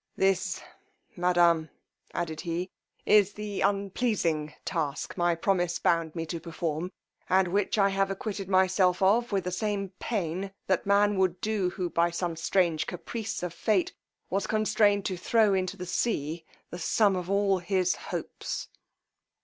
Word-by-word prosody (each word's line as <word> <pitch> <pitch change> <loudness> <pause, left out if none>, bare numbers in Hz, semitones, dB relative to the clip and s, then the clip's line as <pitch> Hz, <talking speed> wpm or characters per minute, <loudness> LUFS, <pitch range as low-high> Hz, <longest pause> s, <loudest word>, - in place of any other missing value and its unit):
This, 190 -1 +1 0.5
madame, 175 -3 +3 0.4
added 160 -2 -3
he, 175 +2 -3 0.3
is 205 -1 +5
the 210 -1 -4
unpleasing 195 -6 0
task 155 -5 -2
my 175 -1 +2
promise 175 0 +1
bound 165 -1 +1
me 165 -1 -2
to 165 +1 -4
perform, 165 +1 -3 0.4
and 190 0 +4
which 200 +3 0
I 200 -1 +4
have 195 0 +1
acquitted 195 0 -4
myself 185 -1 +3
of 230 +5 +3
with 195 -2 +1
the 180 - -3
same 200 0 -2
pain 190 -2 -2
that 190 0 0
man 205 0 +4
would 185 -2 +1
do 210 -3 0
who, 180 0 -3
by 170 0 +2
some 170 -1 -2
strange 165 -1 +1
caprice 205 +3 -5
of 175 -2 -3
fate, 190 +1 +1 0.3
was 195 +1 -1
constrained 210 -2 +2
to 185 - -2
throw 215 +2 +3
into 190 +1 -1
the 180 - -5
sea 165 -5 -1 0.3
the 175 - -6
sum 200 +3 +3
of 180 0 -4
all 200 -1 +2
his 185 0 +1
hopes. - - -5
185 Hz, 150 wpm, -28 LUFS, 175-200 Hz, 0.5 s, is